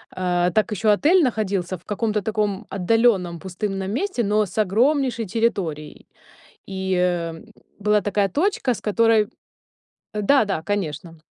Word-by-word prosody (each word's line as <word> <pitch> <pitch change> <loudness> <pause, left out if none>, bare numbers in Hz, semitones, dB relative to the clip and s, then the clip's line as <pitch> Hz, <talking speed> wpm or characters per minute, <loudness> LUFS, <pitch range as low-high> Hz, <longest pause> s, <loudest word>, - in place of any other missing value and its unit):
Э, 180 -1 +1
так 215 -1 +2
ещё 210 +1 +2
отель 315 - +4
находился 195 -7 -1
в 170 - -26
каком-то 210 0 -1
таком 210 -1 -2
отдалённом 195 -3 +1
пустынном 195 +1 -4
месте, 260 - -1
но 210 +1 +2
с 185 - -12
огромнейшей 235 +4 +2
территорией. 185 -8 -2 0.6
И, 190 -1 -3
м, 175 +1 -1 0.3
была 210 +1 +3
такая 205 -1 0
точка, 300 - 0
с 215 - -8
которой 220 0 +3 0.9
Да-да, 210 - +2
конечно. 165 -4 -4
205 Hz, 125 wpm, -22 LUFS, 180-225 Hz, 0.9 s, отель